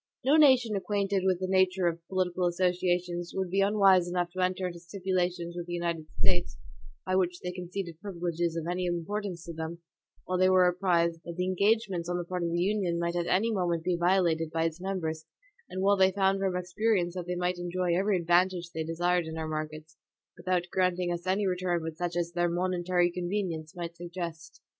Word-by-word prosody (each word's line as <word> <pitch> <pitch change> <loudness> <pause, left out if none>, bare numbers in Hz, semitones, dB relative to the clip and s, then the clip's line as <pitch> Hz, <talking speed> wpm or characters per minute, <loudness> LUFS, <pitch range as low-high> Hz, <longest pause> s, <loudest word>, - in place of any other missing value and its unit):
No 275 +4 +4
nation 260 -8 +5
acquainted 200 -1 0
with 185 -2 +2
the 185 - -2
nature 185 -1 +2
of 170 -1 +1
our - - -36
political 185 -1 0
association 180 0 0
would 190 -2 -2
be 195 +1 +2
unwise 195 -3 +4
enough 175 -1 -1
to 185 - -7
enter 185 0 0
into 175 -1 -5
stipulations 180 -1 -2
with 175 -1 -5
the 175 - -5
United 170 -2 -2
States, 175 -1 0 0.5
by 185 - 0
which 180 -2 +1
they 180 - -3
conceded 180 -1 -6
privileges 170 -4 -2
of 165 -1 -3
any 180 +1 -1
importance 175 +1 -3
to 170 - -6
them, 160 +1 -5 0.5
while 185 0 -1
they 185 0 +5
were 185 -1 +5
apprised 170 -2 +1
that 170 - -7
the 180 - 0
engagements 195 -2 +1
on 175 - 0
the 175 - -2
part 180 +1 -4
of 170 - 0
the 170 +1 -1
Union 185 -2 +1
might 170 0 -1
at 175 -1 -1
any 225 +5 +2
moment 175 -4 0
be 180 0 +1
violated 170 -2 +2
by 165 +1 -1
its 165 +1 -2
members, 160 -5 -3 0.4
and 185 - -3
while 200 +1 +4
they 190 0 +5
found 195 0 +2
from 190 -2 0
experience 180 0 0
that 180 -1 -5
they 180 - -2
might 180 0 -1
enjoy 175 0 -1
every 195 +2 +2
advantage 175 0 +2
they 160 -1 -3
desired 175 +1 0
in 160 0 -6
our 160 -1 -3
markets, 155 0 -5 0.4
without 180 -1 0
granting 180 -1 +1
us 175 +1 -6
any 195 +2 +1
return 180 -2 0
but 160 -1 -5
such 175 0 -3
as 170 -1 -1
their 175 0 +1
momentary 175 0 +1
convenience 175 -3 -3
might 170 -1 -5
suggest. 170 -1 -7
180 Hz, 205 wpm, -29 LUFS, 170-185 Hz, 0.5 s, nation